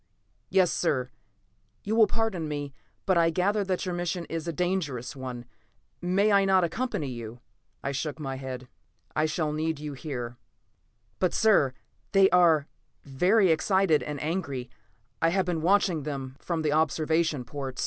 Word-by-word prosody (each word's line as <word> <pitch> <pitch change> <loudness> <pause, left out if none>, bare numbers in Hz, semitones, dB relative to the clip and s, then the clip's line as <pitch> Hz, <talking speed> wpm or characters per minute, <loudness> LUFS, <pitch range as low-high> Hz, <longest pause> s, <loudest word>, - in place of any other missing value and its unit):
"Yes, 185 -2 +4
sir. 130 -7 0 0.7
You 215 +2 -1
will 225 -2 +6
pardon 220 -8 -1
me, 145 -2 -4 0.3
but 185 -3 +3
I 165 0 +4
gather 200 +5 +1
that 190 0 -1
your 180 - -2
mission 175 0 -2
is 165 0 -4
a - - 0
dangerous 155 -8 -2
one. 125 -2 -6 0.6
May 190 +4 +2
I 200 -1 +5
not 190 -1 +4
accompany 205 - -2
you?" 120 -1 -7 0.4
I 140 - -1
shook 145 +2 -3
my 135 -3 -4
head. 130 -1 -6 0.5
"I 155 - +2
shall 155 -1 -1
need 160 0 -1
you 150 -1 -5
here." 125 -4 -5 0.8
"But, 185 -2 +1
sir, 195 -12 +4 0.4
they 195 -1 +6
are 165 -5 +5 0.4
very 180 +8 +3
excited 175 0 +3
and 150 -1 -5
angry; 140 -7 -3 0.5
I 165 - +4
have 190 +2 +1
been 175 -3 -1
watching 180 -2 +3
them 135 -3 -5
from 165 -3 -2
the 150 - +1
observation 155 -1 +1
ports. 135 0 -6
160 Hz, 160 wpm, -27 LUFS, 140-185 Hz, 0.8 s, will